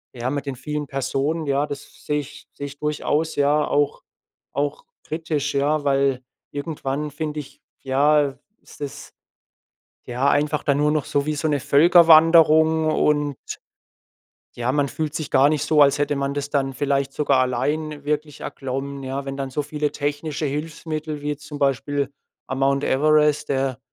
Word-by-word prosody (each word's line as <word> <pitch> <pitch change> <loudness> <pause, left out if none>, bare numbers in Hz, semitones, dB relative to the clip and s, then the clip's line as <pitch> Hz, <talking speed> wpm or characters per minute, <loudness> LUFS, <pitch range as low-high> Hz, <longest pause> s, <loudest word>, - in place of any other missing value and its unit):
ja, 120 +1 -2
mit 145 0 -3
den 140 -2 -4
vielen 150 +3 -4
Personen, 135 +4 -2
ja, 140 +1 +1
das 145 -1 -9
sehe 150 0 0
ich 145 0 -13
sehe 145 - -6
ich 140 +1 -11
durchaus, 150 +1 -1
ja, 145 +1 +2
auch 145 0 0 0.5
auch 145 +2 -2 0.2
kritisch, 155 -3 -2
ja, 145 +2 +1
weil 135 -2 +2 0.3
irgendwann 145 0 -3
finde 150 0 -4
ich, 140 - -16 0.2
ja, 140 +1 +2 0.2
ist - - -17
das 145 -2 -7 0.9
ja, 125 +3 -1
einfach 150 +1 +1
dann 140 -2 +2
nur 150 0 +3
noch 150 -3 0
so 140 -1 0
wie 155 - 0
so 150 +2 -1
'ne 145 -2 +1
Völkerwanderung 160 0 +6
und, 145 -2 +1 1.2
ja, 120 +1 -1
man 145 0 +1
fühlt 155 0 -4
sich 155 - -4
gar 135 +2 +5
nicht 150 -2 0
so, 155 -1 +4
als 140 0 +5
hätte 145 0 +1
man 140 0 -1
das 145 0 -3
dann 135 -2 0
vielleicht 140 0 0
sogar 140 -3 +2
allein 145 +4 -2
wirklich 150 0 -2
erklommen, 135 +1 -5
ja. 135 +1 -4
Wenn 135 0 -4
dann 135 -1 -3
so 150 +3 -1
viele 150 0 -2
technische 145 +1 -3
Hilfsmittel 155 +1 -4
wie 150 0 -1
zum 145 0 -9
Beispiel 140 0 0 0.4
am 130 - -4
Mount 140 +1 +2
Everest, 150 +1 +3
der 135 -2 -1
145 Hz, 165 wpm, -22 LUFS, 140-150 Hz, 1.2 s, Völkerwanderung